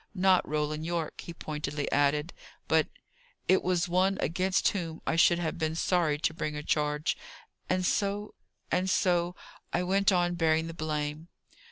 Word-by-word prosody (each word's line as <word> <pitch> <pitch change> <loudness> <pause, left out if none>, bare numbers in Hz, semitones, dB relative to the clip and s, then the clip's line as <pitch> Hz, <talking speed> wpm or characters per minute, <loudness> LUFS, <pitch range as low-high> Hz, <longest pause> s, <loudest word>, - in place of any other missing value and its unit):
Not 185 -1 +3
Roland 150 0 -1
Yorke," 165 -1 -3
he - - -8
pointedly 150 -3 -4
added. 145 +3 +2 0.3
"But - - +3 0.6
it 190 - +4
was 180 -1 +1
one 185 +2 +2
against 185 +5 +1
whom 165 -5 -4
I - - 0
should 170 +1 +5
have 170 -1 -3
been 160 -1 -1
sorry 165 -3 +1
to 155 +1 0
bring 155 -2 -3
a 150 - -5
charge. 150 0 0 0.5
And 185 0 +1
so 205 +2 0 0.4
and 185 +1 +1
so 180 -3 +2 0.4
I - - 0
went 195 +2 +3
on 175 -1 +2
bearing 160 -1 +2
the 165 - -6
blame." 155 0 -3
170 Hz, 160 wpm, -29 LUFS, 155-180 Hz, 0.6 s, should